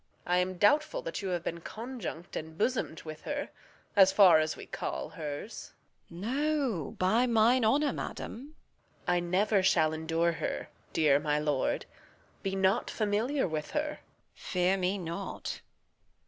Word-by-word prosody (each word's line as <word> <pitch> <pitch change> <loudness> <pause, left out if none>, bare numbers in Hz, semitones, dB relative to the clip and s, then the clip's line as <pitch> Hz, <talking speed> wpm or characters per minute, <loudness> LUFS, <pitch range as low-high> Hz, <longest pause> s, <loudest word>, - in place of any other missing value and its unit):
Reg. - - -4
I - - +5
am 185 0 -1
doubtful 305 - +3
that - - -4
you 195 - -3
have 175 -2 -1
been 170 0 -3
conjunct 220 -6 -7
And 160 0 -6
bosom'd 215 -7 -1
with 155 -1 -8
her, 290 0 -3 0.5
as 190 -2 +7
far 185 -6 +7
as 155 0 -1
we - - -8
call 65 - -4
hers. 150 +7 -6 0.4
Edm. 170 - -10
No, 265 - -1
by 220 +7 +3
mine 235 +2 +4
honour, 285 +7 +3
madam. 280 +7 -6 0.5
Reg. 180 - +3
I - - +3
never 190 +4 +2
shall 160 -4 +3
endure 165 +2 +1
her. 165 - -4 0.2
Dear 145 -3 +4
my 150 0 0
lord, 150 -3 0 0.6
Be 195 0 -2
not 190 +4 +2
familiar 220 +5 0
with 155 -2 -3
her. 300 0 -2 0.4
Edm. - - -23
Fear 185 0 +1
me 185 +2 0
not. 180 +2 -5
190 Hz, 160 wpm, -30 LUFS, 165-235 Hz, 0.6 s, as